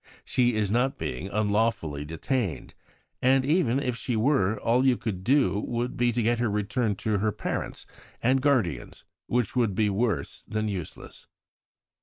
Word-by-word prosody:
She 120 -2 +2
is 105 -2 0
not 125 +4 +1
being 65 +9 -4
'unlawfully 105 -8 0
detained'; 80 - -3 0.5
and 130 +1 +4
even 140 -5 +2
if 125 -4 -1
she 120 0 -2
were, 110 -4 +2
all 120 +4 +2
you 130 -2 +4
could 95 -5 -4
do 130 -3 +3
would 120 +3 -3
be 120 0 +2
to 120 0 0
get 120 +1 +1
her 120 -2 +1
returned 105 +1 -1
to 105 -2 0
her 110 +2 +1
parents - - -4 0.3
and 130 +2 +2
guardians, 105 - 0 0.2
which 120 -1 0
would 115 -6 +1
be 105 0 +2
worse 110 +2 -1
than 110 0 -2
useless. 95 -6 -7
115 Hz, 160 wpm, -27 LUFS, 100-125 Hz, 0.5 s, and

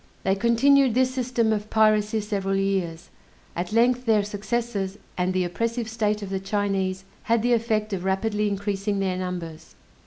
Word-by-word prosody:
They 190 - +2
continued 235 +4 +4
this 255 0 +2
system 240 -3 +1
of 210 0 -3
piracy 215 0 +3
several 200 -2 -2
years; 190 -4 -2 0.4
at 175 +2 -3
length 245 +2 +2
their 215 -2 +4
successes, 205 -1 -3 0.2
and 180 0 0
the 185 0 +1
oppressive 230 +6 -2
state 215 -2 -1
of 195 - -6
the 190 - -1
Chinese, 195 -1 -1 0.2
had 230 -1 +2
the 245 0 +3
effect 220 -2 0
of 185 -2 -3
rapidly 210 +2 0
increasing 200 0 -2
their 190 -2 0
numbers. 180 -3 -6
210 Hz, 160 wpm, -25 LUFS, 190-230 Hz, 0.4 s, continued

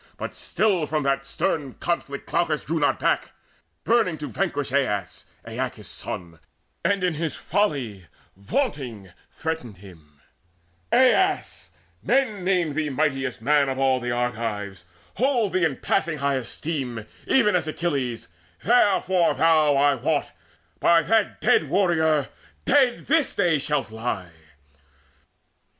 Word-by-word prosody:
But - - -5
still 190 -8 0
From 155 0 -1
that 135 0 0
stern 140 -2 -2
conflict 140 -5 -3
Glaucus 165 -3 0
drew 165 +1 -1
not 145 - +2
back, - - 0 0.5
Burning 225 -8 +2
to 150 0 -5
vanquish 145 -8 -2
Aias, 105 -10 -1 0.2
Aeacus' - - -4
son, 85 -2 -7 0.4
And 195 +2 +1
in 180 -2 +1
his 160 0 -3
folly 125 - -1 0.3
vaunting 115 - -3 0.2
threatened 155 - -5
him: 80 -7 -16 0.7
"Aias, 375 +10 +2 0.3
men 225 -8 +1
name 180 -5 +1
thee 155 0 -1
mightiest 135 -3 -1
man 145 -1 +3
of 130 - -3
all 135 -1 +2
The 120 0 -4
Argives, 110 -6 -3 0.3
hold 245 -6 +1
thee 185 - +1
in 150 -4 0
passing 160 -1 0
high 140 -1 0
esteem 130 -3 -4 0.2
Even 210 -7 +4
as 170 -3 0
Achilles: 140 -8 -2 0.4
therefore 190 -6 +3
thou, 155 -3 +4
I 145 +1 +4
wot, 145 +4 -1 0.5
By 170 -1 +4
that 220 -2 +1
dead - - +3
warrior 160 -6 +2 0.4
dead 255 -4 +3
this 315 0 +2
day 175 -6 +2
shalt 150 -5 -1
lie!" 110 -6 -4
150 Hz, 130 wpm, -24 LUFS, 125-180 Hz, 0.7 s, Even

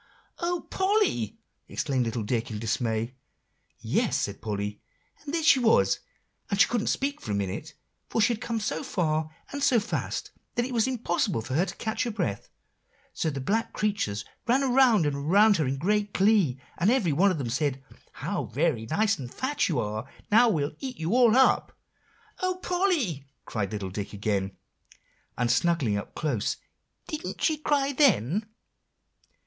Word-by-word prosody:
"O 350 0 -1
Polly!" 380 - +1 0.3
exclaimed 130 -3 -1
little 115 0 -2
Dick 115 +2 -1
in 110 - -4
dismay. 115 +1 -1 0.6
"Yes," - - 0
said - - -3
Polly; 105 -1 -3 0.4
"and 290 - -6
there 330 0 -1
she 280 -4 +6
was, 230 -2 +4 0.5
and 200 - -1
she - - +7
couldn't 235 -3 -1
speak 280 +1 -1
for 105 - -5
a - - 0
minute, 100 +10 -4 0.3
for - - -1
she 230 +3 +4
had 220 - -7
come 230 -1 -2
so 160 -7 -2
far 155 -3 0 0.2
and 285 - -4
so 250 -4 +4
fast, 210 - -3 0.2
that 240 - +1
it 255 - -5
was 230 0 +2
impossible 210 - 0
for 130 +4 -6
her 175 +7 +2
to - - -6
catch 220 0 -3
her - - -1
breath, 175 - -3 0.6
so 160 - -1
the 140 -2 -4
black 215 - -1
creatures 150 - -1 0.2
ran 260 +4 +3
around 250 - +4
and 145 -1 0
around 195 +9 +4
her 155 -4 0
in 135 +1 -1
great 205 +6 0
glee, 195 - +3 0.2
and 185 - +3
every 220 - +2
one 190 +8 +4
of 185 - 0
them 125 -5 -3
said: 135 0 -1 0.3
'How - - -3
very 110 0 0
nice 215 - +1
and 125 -2 -7
fat 270 -3 -1
you 160 - 0
are; 110 +4 -3 0.2
now 235 +3 +6
we'll 150 -7 -1
eat 260 -4 -5
you 165 +8 -1
up.'" 250 +1 +4 0.6
"O 370 0 0
Polly!" 320 - 0 0.2
cried 100 -4 -3
little 100 -3 -4
Dick 100 +2 -5
again, 100 -2 -2 0.8
and 120 0 +1
snuggling 140 -5 +2
up 100 - -5
closer; 130 -9 -1 0.5
"didn't 310 +2 -5
she 315 - +2
cry 285 -2 +1
then." 210 - +3
175 Hz, 170 wpm, -27 LUFS, -, 0.8 s, she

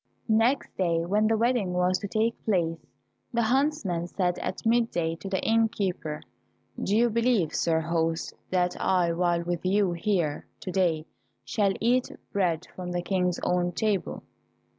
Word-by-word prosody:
Next 225 +5 +2
day 170 -3 +1
when 210 +4 +2
the 225 0 +2
wedding 230 -5 +1
was 180 +1 +2
to 200 - -4
take 220 +3 -1
place, 170 -6 0 0.4
the 235 -2 +1
huntsman 230 - +1
said 180 0 -1
at - - -5
mid 230 +1 +3
day 165 -1 -1
to 195 - -7
the 190 -1 0
inn 225 0 +3
keeper, 180 -8 -3 0.6
"Do 205 +2 +1
you 240 +1 +5
believe, 230 -7 +1
sir 160 -1 +1
host, 165 0 -1 0.2
that 180 -1 +1
I 180 -2 +2
while 170 0 +1
with 175 -1 -3
you 195 0 +2
here 170 -4 -1
to 185 - -5
day 170 -4 +1 0.4
shall 195 - +1
eat 245 +3 +2 0.2
bread 180 -4 +1
from 180 -1 -5
the 175 0 -1
King's 180 -2 0
own 175 0 +1
table?" 210 -2 -1
185 Hz, 160 wpm, -27 LUFS, 170-220 Hz, 0.6 s, you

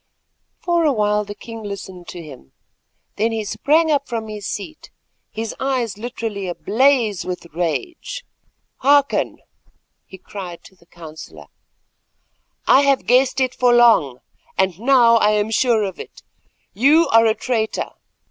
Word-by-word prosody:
For 345 -1 +1
a 305 - +3
while 210 -3 +1
the 205 0 -8
king 225 0 -9
listened 195 -3 -8
to 175 -2 -8
him, 130 - -13 0.6
then 225 +2 +1
he 220 -1 -3
sprang 310 +8 +2
from 230 -5 -5
his 210 -2 -6
seat, 305 +10 -7 0.4
his 225 0 -5
eyes 255 -6 -1
literally 215 -3 -5
ablaze 225 +2 +1
with 180 -1 -6
rage. 345 - -4 0.5
"Hearken," 285 0 +2 0.7
he 190 - -12
cried 185 -2 -9
to 190 - -17
the 170 -2 -26
counsellor; 160 -2 -12 1.2
"I 270 - +6
have 275 -1 +2
guessed 255 +2 +3
it 260 -1 +1
for 250 -2 +3
long, 220 - +4 0.4
and 190 -2 0
now 235 -1 +5
I 210 -1 +3
am 210 +1 0
sure 230 -1 +2
of 190 -3 -5
it. - - -11 0.5
You 295 +8 +4
are 225 -3 +5
a 220 - +2
traitor. 225 -4 -2
225 Hz, 140 wpm, -20 LUFS, 195-260 Hz, 1.2 s, I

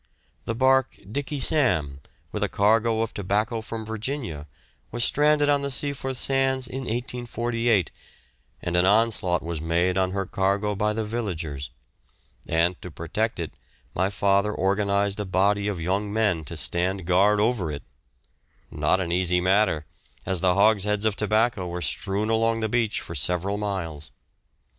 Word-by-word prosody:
The 115 - -2
barque 130 +1 +3
"Dickey 145 +3 -3
Sam" 115 - +2 0.3
with - - -4
a - - +1
cargo 110 +2 +2
of 115 - -5
tobacco 105 +4 -1
from 110 0 -6
Virginia 110 - -4 0.4
was 120 +1 0
stranded 150 +2 +3
on 145 -1 +3
the 140 - -2
Seaforth 135 0 -2
sands 135 -1 +1
in 130 0 -5
1848, 120 - -1 0.7
and 85 - -2
an 90 +1 +4
onslaught 100 -4 +2
was 85 -2 -4
made 85 +3 +1
on 95 -1 +1
her 95 +1 -2
cargo 100 +3 0
by 105 +1 0
the 110 0 -2
villagers; 85 - -4 0.8
and 85 +2 +1
to 90 - -7
protect 90 +7 -3
it, 80 -3 -4 0.4
my 95 +2 +1
father 100 +1 +1
organised 100 +1 +1
a - - 0
body 100 +2 +1
of 100 -4 -2
young 95 +5 -1
men 105 -7 +1
to 80 +3 -6
stand 90 +3 0
guard 100 +4 +3
over 105 -6 +1
it 70 -1 -6 0.9
not 75 +5 +1
an 85 -3 -2
easy 90 0 +2
matter, 95 -4 +2 0.4
as 95 -1 +1
the 90 0 +2
hogsheads 105 0 +3
of 110 -2 +2
tobacco 110 -2 +1
were 90 0 -4
strewn 100 +6 -1
along 115 0 +2
the 110 - +1
beach 115 -1 0
for - - -8
several 90 +7 -1
miles. 85 -8 -4
100 Hz, 155 wpm, -25 LUFS, 90-115 Hz, 0.9 s, an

